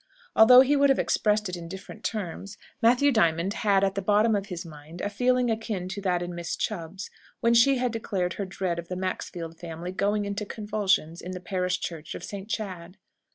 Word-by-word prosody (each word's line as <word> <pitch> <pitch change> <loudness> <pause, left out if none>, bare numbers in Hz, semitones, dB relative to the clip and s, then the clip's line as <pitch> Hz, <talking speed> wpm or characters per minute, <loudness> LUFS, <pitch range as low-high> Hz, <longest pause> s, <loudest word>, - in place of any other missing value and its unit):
Although 250 +3 +9
he 275 +2 +3
would 280 0 +4
have 270 - +4
expressed 210 0 +1
it 180 - -4
in 170 -1 -8
different 190 +4 -9
terms, 200 -1 -4 0.2
Matthew 250 +5 +5
Diamond 175 -4 +2
had 200 -2 +3
at 195 -1 +2
the 195 - -2
bottom 210 +3 +3
of 200 0 -2
his 180 -2 -6
mind 155 +1 -11
a 205 - -2
feeling 250 +2 +2
akin 220 -5 -3
to 200 +1 -5
that 180 -2 0
in 175 0 -5
Miss 170 -1 -4
Chubb's, 190 -1 -4 0.3
when 235 0 +3
she 260 +4 +5
declared 200 -6 -2
her 200 - -4
dread 180 -2 -3
of 170 - -7
the 180 - -4
Maxfield 175 -3 -4
family 170 +1 -6
"going 205 +2 0
into 200 +1 -3
convulsions" 205 -6 -1
in 185 - -6
the 180 - -5
parish 180 0 -1
church 160 -3 -5
of - - -8
St. 200 0 -7
Chad. 185 -4 -5
195 Hz, 200 wpm, -27 LUFS, 175-215 Hz, 0.3 s, Although